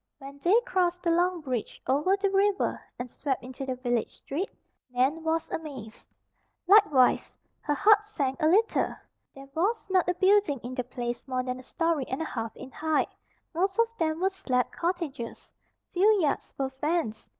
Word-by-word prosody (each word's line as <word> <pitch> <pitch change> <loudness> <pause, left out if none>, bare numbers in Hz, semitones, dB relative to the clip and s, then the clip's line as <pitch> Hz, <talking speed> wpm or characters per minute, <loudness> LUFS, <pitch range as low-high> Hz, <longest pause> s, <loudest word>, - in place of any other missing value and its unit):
When 275 0 -11
they 370 +10 +4
crossed 360 -7 0
the 340 - +2
long 350 +1 +2
bridge 255 -6 -4
over 300 +9 +2
the 395 -1 0
river 395 0 +1 0.2
and 245 - -4
swept 265 +2 -3
into 260 +2 -7
the 260 - -1
village 245 -2 -1
street, 335 +9 -4 0.4
Nan 265 +6 +1
was 325 0 -1
amazed. 265 -9 -7 0.6
Likewise, 360 -10 +5 0.2
her 295 - -1
heart 425 +5 +5
sank 290 -9 -3
a 310 - +4
little. 425 +7 +2 0.4
There 275 0 -11
was 410 +9 0
not 370 -1 +3
a 360 - +1
building 380 -7 +3
in 245 +2 -5
the 250 - -2
place 240 +1 -5
more 255 -1 -1
than 255 0 -4
a - - -9
story 325 +1 -1
and 260 - -3
a 320 - -2
half 225 -6 -4
in 265 - -9
height. 315 +2 0 0.4
Most 380 +5 0
of 460 0 +2
them 315 -1 0
were 380 +1 +2
slab 255 -10 -1
cottages. 335 -9 -4 0.4
Few 370 +3 +4
yards 300 -5 0
were 270 -1 -1
fenced. 280 -5 -2
315 Hz, 175 wpm, -28 LUFS, 260-370 Hz, 0.6 s, Likewise